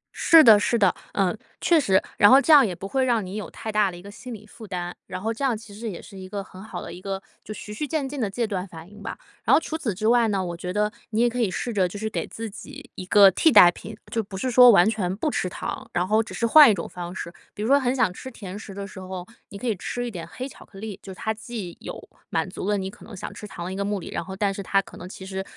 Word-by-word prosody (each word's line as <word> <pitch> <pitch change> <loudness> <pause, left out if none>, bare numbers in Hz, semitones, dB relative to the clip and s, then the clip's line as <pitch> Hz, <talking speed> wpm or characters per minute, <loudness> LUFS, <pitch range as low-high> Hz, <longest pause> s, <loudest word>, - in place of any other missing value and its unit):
是 325 -1 +7
的 220 -4 +8
是 220 +3 +1
的， 195 -5 +4 0.2
嗯， 195 -1 +1 0.2
确 335 -2 +4
实， 190 -9 +3 0.2
然 205 - +7
后 265 - +8
这 310 +3 +4
样 285 -3 +8
也 185 -4 -3
不 185 +3 -7
会 265 +5 0
让 235 -5 +1
你 185 +2 -7
有 215 - -5
太 220 - -6
大 210 -2 +3
的 175 - -9
一 - - -11
个 200 +2 -11
心 250 +4 -10
理 215 -2 -9
负 220 +1 -12
担， 175 -2 -4
然 185 - -5
后 220 +4 -2
这 230 - -6
样 255 -5 +1
其 215 -1 -13
实 220 +2 -5
也 180 - -7
是 - - -13
一 185 0 -9
个 200 0 -4
很 185 0 -13
好 220 - -7
的 - - -8
一 180 - -10
个 195 0 -4 0.2
就 - - -9
循序渐进 270 +6 -4
的 215 - 0
戒 235 +4 -1
断 195 -4 -3
反 165 -2 -11
应 205 0 -14
吧。 - - -6 0.3
然 - - +1
后 - - +7
除 320 - -5
此 310 -9 -2
之 215 +4 -1
外 235 0 +4
呢， 195 -3 0
我 175 -1 -4
觉 180 +1 -5
得 210 +2 0 0.2
你 220 -1 -1
也 240 - +5
可 245 +1 -3
以 220 - +2
试 235 +5 -3
着 190 -3 +2
就 180 - -8
是 220 +2 -3
给 - - -3
自 225 0 -6
己 205 - -11
一 - - -7
个 200 0 +7
替 320 - +4
代 190 -7 +9
品， 215 +4 -10
就 225 - 0
不 195 -1 -8
是 255 +6 -2
说 250 +1 +9
完 200 -4 +6
全 205 -5 -1
不 290 +9 -1
吃 185 - -1
糖， - - -6
然 180 +1 0
后 215 +3 +3
只 220 - -8
是 235 - 0
换 290 +3 +9
一 210 - +3
种 - - -5
方 175 -1 -7
式， 170 - -6 0.2
比 210 - -4
如 - - -1
说 280 +2 +5
很 255 -1 0
想 220 -8 +2
吃 260 - -8
甜 200 -6 -8
食 210 - -9
的 200 0 -5
时 195 -1 -10
候， 185 -1 -7 0.2
你 200 - -9
可 225 - -8
以 225 -3 +1
吃 245 +6 -4
一 240 - -4
点 175 -5 -7
黑 255 - -5
巧 - - -14
克 195 - -16
力， 210 -1 -7
就 195 - -9
是 - - -9
它 220 - -1
既 220 -5 -7
有 - - -7 0.3
满 165 -1 -1
足 185 +1 -5
了 205 - +2
你 190 0 -4
可 - - -16
能 215 -3 -11
想 - - -6
吃 210 - -9
糖 175 -3 -7
的 185 - -4
一 - - -5
个 200 - -2
目 205 0 -1
的， - - -8
然 - - -3
后 190 +2 -8
但 195 0 0
是 200 - -6
它 195 +1 +2
可 195 - -7
能 180 - -9
其 190 - -9
实 190 0 -4
205 Hz, 340 characters per minute, -24 LUFS, 190-230 Hz, 0.3 s, 代